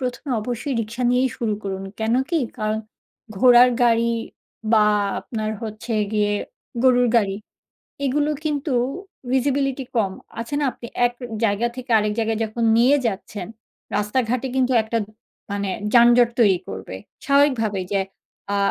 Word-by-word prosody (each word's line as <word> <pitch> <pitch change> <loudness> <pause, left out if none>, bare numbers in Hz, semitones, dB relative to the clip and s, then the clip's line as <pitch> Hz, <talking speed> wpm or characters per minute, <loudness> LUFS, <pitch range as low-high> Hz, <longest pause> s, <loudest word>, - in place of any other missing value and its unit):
১ম 250 +1 -4
এ - - +1
অবশ্যই 245 +5 -3
রিক্সা 230 +3 -5
নিয়েই 250 +1 +3
শুরু 220 -3 0
করুন, 195 -1 -4 0.2
কেন 220 +1 0 0.2
কি? 335 - +2 0.2
কারণ 215 -1 -1 0.6
ঘোড়ার 250 +1 +7
গাড়ি 235 -1 +3 0.6
বা 215 -2 +6 0.4
আপনার 215 -2 -4
হচ্ছে 220 +1 -5 0.2
গিয়ে 210 -1 +1 0.5
গরুর 250 -1 +4
গাড়ি। 200 -4 +2 0.7
এগুলো 290 +3 +1 0.2
কিন্তু 295 -2 -1 0.6
visibility 270 0 0
কম, 205 -5 +1 0.3
আছে 230 +5 -5
না? - - 0
আপনি 235 - -10 0.2
এক 240 - 0 0.3
জায়গা 220 +2 +2
থেকে 255 -1 -7
আরেক 210 0 0
জায়গায় 225 -1 0
যখন 220 +2 -4
নিয়ে 250 +5 +5
যাচ্ছেন, 205 -2 -5 0.5
রাস্তাঘাটে 235 +4 0
কিন্তু 260 -1 +2
একটা 220 +1 -2 0.5
মানে 200 -1 -2 0.2
যানজট 240 0 +6
তৈরি 200 -6 +5
করবে। 95 0 -7 0.3
স্বাভাবিকভাবে 265 -8 +2
যে 200 - +2 0.5
আ - - +1
235 Hz, 140 wpm, -22 LUFS, 215-255 Hz, 0.7 s, ঘোড়ার